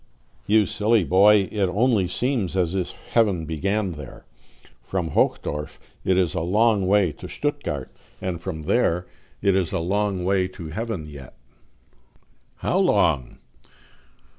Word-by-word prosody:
"You 105 +1 +4
silly 110 0 +2
boy, 100 +4 +5
it 105 -2 +1
only 105 0 +2
seems 110 -1 -1
as 90 -2 +1
if 95 -2 -1
heaven 100 -8 0
began 95 +6 -1
there. 75 -5 -10 0.6
From 85 +5 -3
Hochdorf 75 0 -1 0.2
it 95 -1 +2
is 90 -4 +1
a - - -1
long 105 +2 +2
way 100 -3 +3
to 75 - -10
Stuttgart, 145 - -4 0.2
and 90 -3 -4
from 85 -4 -5
there 90 -1 +1 0.4
it 100 -2 +3
is 95 -4 0
a - - -1
long 95 +2 -1
way 95 0 +2
to 90 -3 -9
heaven 105 -1 -4
yet. 70 -4 -11 1.2
"How - - 0
long?" 65 -4 +2
95 Hz, 140 wpm, -23 LUFS, 85-105 Hz, 1.2 s, boy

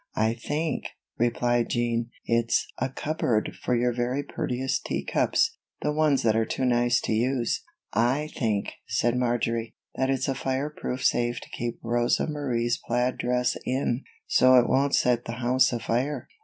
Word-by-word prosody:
"I 110 +1 +2
think," 150 +7 -2 0.3
replied 120 0 +1
Jean, 120 0 0 0.2
"it's 115 0 +2
a 130 - 0
cupboard 130 -6 -1
for 125 - +1
your 120 +1 +1
very 125 +4 -1
prettiest 130 -1 -2
tea - - -2
cups - - +1 0.2
the 150 - +1
ones 150 -2 +2
that 110 -2 +3
are 115 - +3
too 130 +3 -2
nice 120 0 +3
to - - -3
use." 120 +1 0 0.3
"I 135 +7 +1
think," 110 -5 0 0.2
said 120 +1 +1
Marjory, 120 -2 -1 0.2
"that 130 +1 0
it's 135 -1 0
a 135 - +1
fire 135 +3 -2
proof 130 -3 -4
safe 120 0 +2
to - - -12
keep 120 0 -4
Rosa 120 +1 +1
Marie's 125 -6 -1
plaid 125 +2 0
dress 125 0 +1
in, 130 -1 -1 0.2
so 130 0 +5
it 120 -1 +6
won't 140 +1 +3
set 120 -1 +2
the 115 - -4
house 125 +2 +2
afire." 125 +4 -1
120 Hz, 165 wpm, -26 LUFS, 120-130 Hz, 0.3 s, it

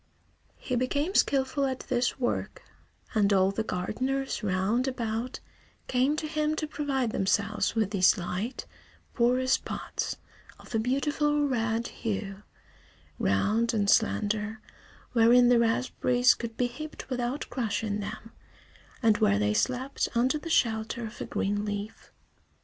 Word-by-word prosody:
He 255 - -3
became 285 +8 0
skilful 275 -2 +2
at 260 -1 -3
this 245 +1 -1
work, 245 - -2 0.5
and 210 -3 +3
all 190 -1 +4
the 210 - -2
gardeners 260 +9 -2
round 210 +6 0
about 235 -1 -3 0.5
came 260 +4 +2
to 310 - -3
him 305 0 0
to 310 - -2
provide 275 -6 -1
themselves 200 +3 0
with 215 -3 +1
these 195 0 +4
light, 190 +6 -4 0.5
porous 255 +2 +2
pots, - - -4 0.4
of - - -13
a 225 - +2
beautiful 290 +4 +1
red 230 -3 0
hue, 200 -2 -4 0.8
round 215 - +1
and 205 -2 +1
slender, 215 0 +1 0.5
wherein 240 +1 +6
the 245 -1 +5
raspberries 245 +1 +3
could 230 -1 -7
be 250 - +2
heaped 295 +6 -7
without 250 +3 -2
crushing 215 -4 -1
them, 215 +2 -7 0.7
and 220 -2 +4
where 100 0 +3
they 105 +1 +1
slept 255 - 0
under 255 +6 +2
the 330 - -7
shelter 225 -4 +1
of 220 +2 -9
a - - -2
green 205 +1 -1
leaf. 205 +1 -5
235 Hz, 135 wpm, -28 LUFS, 210-260 Hz, 0.8 s, wherein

